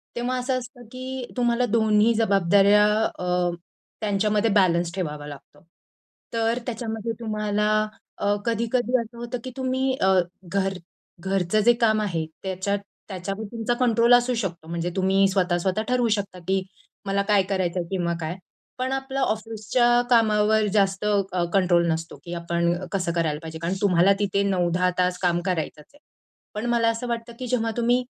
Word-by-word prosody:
तेव्हा 245 Hz, +1 st, -1 dB
असं 255 Hz, +1 st, -1 dB
असतं 245 Hz, 0 st, -12 dB
की 255 Hz, 0 st, -6 dB
तुम्हाला 240 Hz, 0 st, +2 dB
दोन्ही 220 Hz, 0 st, +3 dB
जबाबदाऱ्या 200 Hz, -1 st, +4 dB, 0.3 s
अ, 180 Hz, 0 st, 0 dB, 0.5 s
त्यांच्यामध्ये 210 Hz, +1 st, +1 dB
बॅलन्स 175 Hz, -3 st, +3 dB
ठेवावा 150 Hz, -5 st, -4 dB
लागतो. 145 Hz, +5 st, -13 dB, 0.7 s
तर 230 Hz, +1 st, +1 dB
त्याच्यामध्ये 225 Hz, -2 st, -4 dB
तुम्हाला 210 Hz, -2 st, -1 dB, 0.5 s
अ, 205 Hz, 0 st, +1 dB
कधी-कधी 235 Hz, +2 st, +1 dB
असं 230 Hz, +1 st, -11 dB
होतं 240 Hz, +1 st, -4 dB
की 255 Hz, -, -6 dB
तुम्ही 260 Hz, 0 st, 0 dB
अ, 190 Hz, 0 st, +4 dB, 0.3 s
घर 195 Hz, +2 st, -1 dB, 0.5 s
घरचं 190 Hz, +1 st, 0 dB
जे 240 Hz, +3 st, +5 dB
काम 220 Hz, -2 st, +2 dB
आहे 170 Hz, -6 st, -1 dB, 0.2 s
त्याच्यात 190 Hz, +1 st, -2 dB, 0.3 s
त्याच्यावर 195 Hz, +2 st, -5 dB
तुमचा 230 Hz, 0 st, -1 dB
कंट्रोल 240 Hz, -1 st, +3 dB
असू 245 Hz, +1 st, +4 dB
शकतो 170 Hz, -5 st, -5 dB
म्हणजे 170 Hz, +1 st, -2 dB
तुम्ही 195 Hz, +1 st, +3 dB
स्वतः-स्वतः 185 Hz, +1 st, 0 dB
ठरवू 250 Hz, -1 st, +2 dB
शकता 200 Hz, -3 st, -5 dB
की 190 Hz, 0 st, +2 dB, 0.4 s
"मला 195 Hz, 0 st, +1 dB
काय 205 Hz, -2 st, +5 dB
करायचं 185 Hz, -2 st, -1 dB
आहे" 170 Hz, -, -4 dB
किंवा 175 Hz, -3 st, -1 dB
काय. 160 Hz, +1 st, -3 dB, 0.4 s
पण 255 Hz, +1 st, -2 dB
आपलं 270 Hz, 0 st, -3 dB
ऑफिसच्या 225 Hz, +1 st, +1 dB
कामावर 220 Hz, -2 st, +4 dB
जास्त 195 Hz, -1 st, +1 dB
अ, 195 Hz, -4 st, +1 dB
कंट्रोल 175 Hz, -3 st, +3 dB
नसतो 165 Hz, +1 st, -4 dB
की 175 Hz, -, -6 dB
आपण 170 Hz, 0 st, 0 dB, 0.2 s
कसं 185 Hz, -4 st, -1 dB
करायला 160 Hz, -3 st, 0 dB
पाहिजे? 160 Hz, 0 st, -7 dB
कारण 170 Hz, +3 st, -2 dB
तुम्हाला 190 Hz, -1 st, +4 dB
तिथे 200 Hz, -1 st, +1 dB
9-10 180 Hz, -1 st, +1 dB
तास 180 Hz, 0 st, +1 dB
काम 175 Hz, -2 st, +2 dB
करायचंच 160 Hz, -5 st, -3 dB
आहे. 290 Hz, -, -20 dB, 0.5 s
पण 210 Hz, +2 st, -4 dB
मला 235 Hz, -1 st, +3 dB
असं 230 Hz, +2 st, -3 dB
वाटतं, 235 Hz, 0 st, -4 dB
की 255 Hz, -, -4 dB
जेव्हा 230 Hz, -2 st, 0 dB
तुम्ही 240 Hz, +1 st, +2 dB
205 Hz, 155 wpm, -24 LUFS, 180-235 Hz, 0.7 s, जे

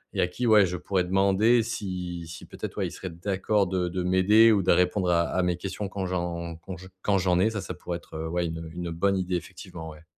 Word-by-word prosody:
et -, -, +2 dB
à -, -, +3 dB
qui, 120 Hz, +8 st, -4 dB
ouais, 105 Hz, -3 st, +7 dB
je 90 Hz, -, -3 dB
pourrais 95 Hz, +1 st, 0 dB
demander 100 Hz, +5 st, +3 dB
si 90 Hz, -6 st, -5 dB
si 80 Hz, 0 st, -9 dB
peut -, -, -13 dB
être, -, -, -5 dB
ouais, -, -, 0 dB
il -, -, -8 dB
serait 95 Hz, -, -7 dB
d'accord 100 Hz, +4 st, 0 dB
de 90 Hz, -1 st, -1 dB
de 90 Hz, +1 st, -3 dB
m'aider 100 Hz, +5 st, +5 dB
ou 100 Hz, -3 st, +3 dB
de -, -, +3 dB
répondre 90 Hz, 0 st, +2 dB
à 85 Hz, -1 st, +3 dB
à 95 Hz, -, -1 dB
mes 90 Hz, -1 st, 0 dB
questions 95 Hz, +2 st, -5 dB
quand 95 Hz, -1 st, -4 dB
j'en 85 Hz, -2 st, -3 dB
quand 90 Hz, +2 st, -8 dB
j 95 Hz, +2 st, -12 dB
quand 100 Hz, 0 st, +2 dB
j'en 90 Hz, -1 st, +2 dB
ai. 110 Hz, +4 st, +4 dB
Ça, 105 Hz, -3 st, -4 dB
ça -, -, -6 dB
pourrait 85 Hz, -1 st, -5 dB
être, -, -, -15 dB
heu, 80 Hz, +1 st, -3 dB
ouais, 85 Hz, 0 st, 0 dB
une, 80 Hz, 0 st, -5 dB
heu, 80 Hz, -1 st, -7 dB
une 85 Hz, -1 st, -4 dB
bonne 95 Hz, +4 st, +1 dB
idée 90 Hz, -1 st, -1 dB
effectivement, 85 Hz, -2 st, -7 dB
ouais. 75 Hz, 0 st, -13 dB
90 Hz, 265 wpm, -27 LUFS, 85-100 Hz, -, ouais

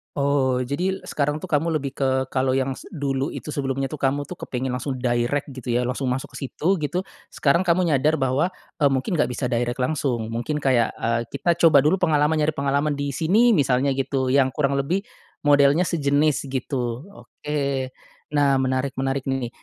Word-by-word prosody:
Oh, 140 Hz, -3 st, +1 dB
jadi 180 Hz, +10 st, -2 dB
sekarang 145 Hz, +1 st, -1 dB
tuh 185 Hz, -, -7 dB
kamu 160 Hz, +2 st, +1 dB
lebih 140 Hz, -1 st, -6 dB
ke 130 Hz, -1 st, 0 dB
kalau 130 Hz, -1 st, +1 dB
yang 135 Hz, 0 st, -1 dB
se -, -, -12 dB
dulu 140 Hz, -2 st, -2 dB
itu -, -, -7 dB
sebelumnya 135 Hz, -2 st, -2 dB
tuh 155 Hz, -, -6 dB
kamu 140 Hz, +1 st, -1 dB
tuh 180 Hz, -, -7 dB
kepengen 130 Hz, +1 st, -4 dB
langsung 130 Hz, +2 st, -3 dB
direct 125 Hz, +3 st, -1 dB
gitu 125 Hz, -3 st, -5 dB
ya, 120 Hz, -, +2 dB
langsung 125 Hz, +2 st, -2 dB
masuk 125 Hz, +1 st, -2 dB
ke 135 Hz, -, -4 dB
situ, 180 Hz, +8 st, 0 dB
gitu. 165 Hz, +4 st, -2 dB, 0.3 s
Sekarang 170 Hz, +6 st, +2 dB
kamu 175 Hz, +1 st, +3 dB
nyadar 150 Hz, +1 st, +3 dB
bahwa, 135 Hz, +8 st, +1 dB, 0.2 s
e 150 Hz, -, +2 dB
mungkin 135 Hz, +6 st, -1 dB
nggak 150 Hz, -, +3 dB
bisa 125 Hz, 0 st, -2 dB
direct 120 Hz, +1 st, -1 dB
langsung, 125 Hz, -5 st, -1 dB
mungkin 120 Hz, +7 st, -3 dB
kayak, 125 Hz, -4 st, +2 dB
eee, 115 Hz, 0 st, -1 dB
kita 170 Hz, -1 st, +1 dB
coba 145 Hz, -4 st, +7 dB
dulu 155 Hz, +6 st, +3 dB
pengalaman, 155 Hz, -3 st, +2 dB
nyari 155 Hz, 0 st, +1 dB
pengalaman 140 Hz, +1 st, 0 dB
di 145 Hz, 0 st, -3 dB
sini, 200 Hz, -, +3 dB
misalnya 135 Hz, -1 st, +2 dB
gitu, 135 Hz, -1 st, -1 dB
yang 130 Hz, -1 st, +3 dB
kurang 140 Hz, -2 st, 0 dB
lebih 170 Hz, +8 st, 0 dB, 0.4 s
modelnya 145 Hz, +2 st, +4 dB
sejenis 150 Hz, -3 st, +1 dB
gitu, 130 Hz, +3 st, -3 dB, 0.2 s
oke. 150 Hz, 0 st, -5 dB, 0.8 s
Nah 140 Hz, -2 st, +4 dB
menarik 130 Hz, +1 st, -1 dB
menarik 135 Hz, 0 st, -2 dB
nih. 135 Hz, -3 st, -1 dB
140 Hz, 185 wpm, -23 LUFS, 130-150 Hz, 0.8 s, coba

